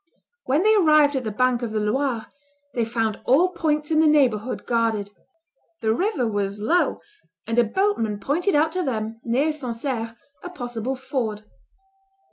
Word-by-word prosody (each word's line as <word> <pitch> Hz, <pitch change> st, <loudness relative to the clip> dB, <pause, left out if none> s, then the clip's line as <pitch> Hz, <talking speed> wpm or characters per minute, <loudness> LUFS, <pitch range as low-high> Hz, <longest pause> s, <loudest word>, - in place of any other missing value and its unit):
When 285 Hz, +7 st, +2 dB
they 435 Hz, +1 st, +5 dB
arrived 305 Hz, -7 st, +5 dB
at 260 Hz, -2 st, -2 dB
the -, -, -1 dB
bank 250 Hz, +3 st, +1 dB
of 235 Hz, -2 st, -3 dB
the 215 Hz, -, 0 dB
Loire, 230 Hz, +1 st, -1 dB, 0.5 s
they 235 Hz, -, 0 dB
found 225 Hz, -2 st, -2 dB
all 315 Hz, +9 st, +4 dB
points 305 Hz, -3 st, -1 dB
in 310 Hz, -, +3 dB
the 315 Hz, -, +5 dB
neighborhood 255 Hz, -6 st, +2 dB
guarded; 225 Hz, -4 st, 0 dB, 0.7 s
the 220 Hz, 0 st, +2 dB
river 295 Hz, -, 0 dB
was 205 Hz, -1 st, -2 dB
low; 285 Hz, +13 st, +1 dB, 0.4 s
and 230 Hz, +2 st, 0 dB
a -, -, +6 dB
boatman 225 Hz, -, 0 dB
pointed 330 Hz, -, 0 dB
out 310 Hz, +2 st, +3 dB
to 365 Hz, -, -2 dB
them, 225 Hz, -6 st, -3 dB
near 265 Hz, +7 st, +1 dB
Sancerre, 235 Hz, -4 st, -4 dB, 0.3 s
a 360 Hz, -, -6 dB
possible 245 Hz, -5 st, -4 dB
ford. 245 Hz, -5 st, -3 dB
250 Hz, 160 wpm, -23 LUFS, 225-300 Hz, 0.7 s, a